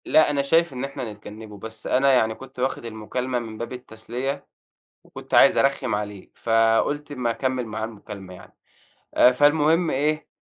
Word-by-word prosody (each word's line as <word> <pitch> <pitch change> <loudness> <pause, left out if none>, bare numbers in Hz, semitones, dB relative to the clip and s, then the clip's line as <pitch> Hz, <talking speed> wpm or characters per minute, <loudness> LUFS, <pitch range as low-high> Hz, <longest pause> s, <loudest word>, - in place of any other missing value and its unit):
لأ 155 - +5
أنا 145 -1 +1
شايف 165 +2 +2
إن 125 0 -4
إحنا 135 -5 -5
نتجنّبه، 105 0 -11
بس 110 +1 -8
أنا 135 +2 +4
يعني 110 -3 +3
كنت 130 +1 -12
واخد 130 -1 -1
المكالمة 120 +3 -3
من 110 -2 -7
باب 115 +3 -5
التسلية، 125 +3 -5 0.6
وكنت - - -8
عايز - - +7
أرخّم 135 -4 +1
عليه، 105 -2 -5
فقُلت 115 +6 +1
أما 125 -4 -1
اكمّل 130 +1 -1
معاه 110 0 -4
المكالمة 100 -4 -9
يعني، - - -15 0.6
آآ 125 - +6
فالمهم 150 +5 +3
إيه 155 +3 0
125 Hz, 160 wpm, -24 LUFS, 110-140 Hz, 0.6 s, عايز